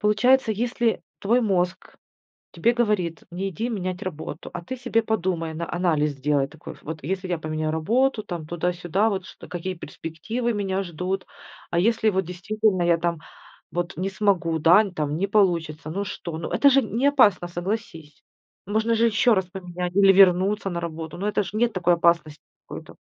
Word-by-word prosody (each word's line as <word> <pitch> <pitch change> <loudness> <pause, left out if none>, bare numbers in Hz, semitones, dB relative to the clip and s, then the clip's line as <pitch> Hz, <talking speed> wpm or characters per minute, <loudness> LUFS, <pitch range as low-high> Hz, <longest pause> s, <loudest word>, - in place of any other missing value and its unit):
Получается, 220 +3 +3
если 235 +1 0 0.2
твой 235 +5 +3
мозг 185 -4 -1 0.6
тебе 220 +8 +2
говорит: 210 -9 0
"Не 190 +3 -3
иди 220 +6 -3
менять 185 -3 -3
работу". 160 -2 -6
А 175 - -6
ты 260 +9 -6
себе 230 -2 0
подумай, 180 -7 -1
на 170 +1 -5
анализ 160 -4 +1
сделай 140 0 0
такой. 150 +2 -11
Ф - - -20
вот 155 -1 -7
если 185 +4 -3
я 175 -2 -1
поменяю 155 0 -2
работу, 230 +9 +1
там 170 -5 -6
туда-сюда, 175 +4 0
вот 190 -2 -3
ш 155 - -12
какие 180 +2 -4
перспективы 220 +10 -4
меня 195 -2 -1
ждут. 180 +2 -4 0.4
А 170 - 0
если 220 +3 +2
вот 190 -1 0
действительно 190 +2 0
я 170 -1 +4
там 170 -1 -1 0.5
вот 175 +1 -3
не 185 +3 -1
смогу, 190 -5 +1
да, 180 +7 +7
н 195 -4 -6
там 150 -1 -2
не 195 +4 0
получится, 170 -7 +1
ну 200 +4 -2
что, 170 -5 -6
ну 165 - -5
это 280 - +5
же 275 0 +5
неопасно, 220 -6 +3
согласись. 175 -5 -5 0.4
Можно 220 +3 +1
же 230 +1 +3
еще 230 +1 +4
раз 190 - +1
поменять 180 -1 -5
или 195 0 +6
вернуться 195 +2 +4
на 170 -1 -3
работу, 160 0 -6
но 205 +2 -1
это 210 - +1
ж 200 - -8
нет 230 +1 +1
такой 175 -1 +3
опасности 170 -3 +1 0.3
какой-то. - - -9
185 Hz, 180 wpm, -24 LUFS, 170-210 Hz, 0.6 s, да